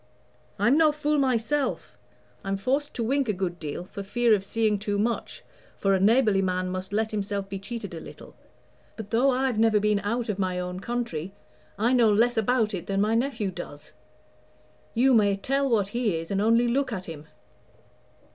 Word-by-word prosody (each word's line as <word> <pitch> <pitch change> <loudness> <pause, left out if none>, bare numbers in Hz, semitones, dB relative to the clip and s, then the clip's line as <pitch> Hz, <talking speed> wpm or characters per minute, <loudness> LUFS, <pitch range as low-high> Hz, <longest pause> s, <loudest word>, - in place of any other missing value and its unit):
I'm 235 +10 +3
no 315 -2 +5
fool 300 0 0
myself; 265 +1 -1 0.5
I'm 195 0 -2
forced 275 +8 -1
to 235 - -2
wink 270 +1 0
a - - +2
good 180 -2 -3
deal, 155 +2 -5
for 200 - -8
fear 235 +3 +2
of 200 -2 +1
seeing 215 0 0
too 205 0 -2
much, 225 +3 -2 0.3
for 195 0 +1
a 190 - +2
neighborly 210 -1 +4
man 185 -1 -1
must 185 +1 -5
let 220 +1 0
himself 200 -2 -3
be 195 0 -5
cheated 200 -1 -7
a 165 - -6
little. - - -12 0.6
But 215 -2 -8
though 245 +4 +3
I've 255 -3 0
never 220 -1 +4
been 210 0 +2
out 230 +4 -2
of 205 -2 -3
my 185 -1 -1
own 180 0 -4
country, 195 -6 -4 0.4
I 230 +5 +2
know 235 -4 +5
less 235 +4 +3
about 225 -1 +1
it 180 -2 -5
than 195 0 -1
my 210 +2 +2
nephew 230 -4 -1
does. 150 -4 -9 1.0
You 260 +3 +4
may 205 -3 +4
tell 275 +7 0
what 205 -5 +1
he 230 -4 0
is, 165 +2 -6
and 195 0 0
only 230 +3 +3
look 260 +2 0
at 190 -4 -4
him. 155 -2 -9
215 Hz, 190 wpm, -26 LUFS, 195-240 Hz, 1.0 s, no